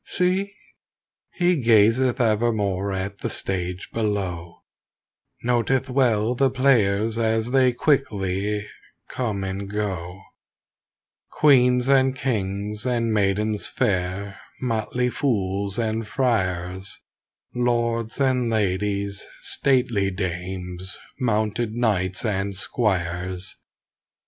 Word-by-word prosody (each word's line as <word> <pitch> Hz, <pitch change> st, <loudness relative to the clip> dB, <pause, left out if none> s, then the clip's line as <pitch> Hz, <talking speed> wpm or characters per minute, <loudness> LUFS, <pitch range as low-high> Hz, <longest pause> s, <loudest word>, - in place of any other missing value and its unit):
See! 190 Hz, +2 st, 0 dB, 0.8 s
He 175 Hz, -4 st, +1 dB
gazeth 115 Hz, +3 st, +4 dB
evermore 105 Hz, -4 st, +1 dB
at 95 Hz, +1 st, -4 dB
the -, -, -3 dB
stage 90 Hz, -1 st, -3 dB
below; 95 Hz, -6 st, -3 dB, 0.8 s
Noteth 125 Hz, +2 st, +1 dB
well 120 Hz, -4 st, +2 dB
the 135 Hz, +2 st, +2 dB
players 115 Hz, -4 st, +2 dB
as 110 Hz, +1 st, +1 dB
they 130 Hz, -1 st, +4 dB
quickly 105 Hz, -7 st, 0 dB, 0.5 s
come 110 Hz, -6 st, -2 dB
and 95 Hz, +1 st, -4 dB
go; 95 Hz, -3 st, -3 dB, 1.1 s
Queens 125 Hz, -4 st, +4 dB
and 135 Hz, -1 st, +4 dB
kings 105 Hz, -3 st, -2 dB
and 120 Hz, -3 st, 0 dB
maidens 105 Hz, +1 st, +1 dB
fair, 95 Hz, +1 st, -1 dB, 0.2 s
motley 125 Hz, +1 st, -1 dB
fools 100 Hz, -7 st, -1 dB
and 110 Hz, -1 st, -1 dB
friars, 95 Hz, -7 st, -1 dB, 0.5 s
Lords 120 Hz, -1 st, 0 dB
and 130 Hz, -3 st, +2 dB
ladies, 100 Hz, -1 st, -1 dB, 0.2 s
stately 125 Hz, -7 st, +1 dB
dames, 90 Hz, 0 st, -4 dB, 0.2 s
mounted 110 Hz, -2 st, 0 dB
knights 95 Hz, -5 st, 0 dB
and 100 Hz, -2 st, -1 dB
squires. 90 Hz, -3 st, -1 dB
105 Hz, 90 wpm, -24 LUFS, 95-125 Hz, 1.1 s, gazeth